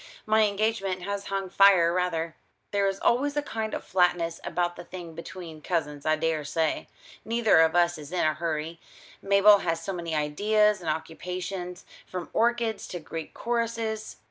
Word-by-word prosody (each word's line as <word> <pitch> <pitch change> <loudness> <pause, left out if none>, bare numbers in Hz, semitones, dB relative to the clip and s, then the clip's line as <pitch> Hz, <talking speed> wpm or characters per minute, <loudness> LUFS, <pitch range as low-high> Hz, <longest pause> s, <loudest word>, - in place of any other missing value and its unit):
My 215 0 +4
engagement 200 -3 -1
has 200 +1 -3
hung 195 -1 -2
fire 190 -4 +6
rather. 165 -3 -1 0.4
There 200 -1 +2
is 195 0 -2
always 285 +4 +1
a 295 - +1
kind 220 -5 -3
of - - -5
flatness 175 -2 +1
about 175 +1 -1
the - - -8
thing 175 -2 -9
between 170 -1 -9
cousins, 150 -4 -2
I 155 - +4
daresay. 160 0 -1 0.4
Neither 225 -4 +3
of 160 +1 +4
us 175 -2 +3
is 150 +1 -10
in 180 - +1
a 155 - +3
hurry. 160 +1 -3 0.4
Mabel 200 +1 +6
has 165 -2 -2
so 195 - -3
many 170 -2 -3
ideas 205 +7 +2
and 165 - -3
occupations, 180 +3 -4 0.2
from 180 -2 -6
orchids 235 -2 +1
to 175 - -5
Greek 160 0 -7
choruses." 230 -2 -2
180 Hz, 165 wpm, -27 LUFS, 165-210 Hz, 0.4 s, fire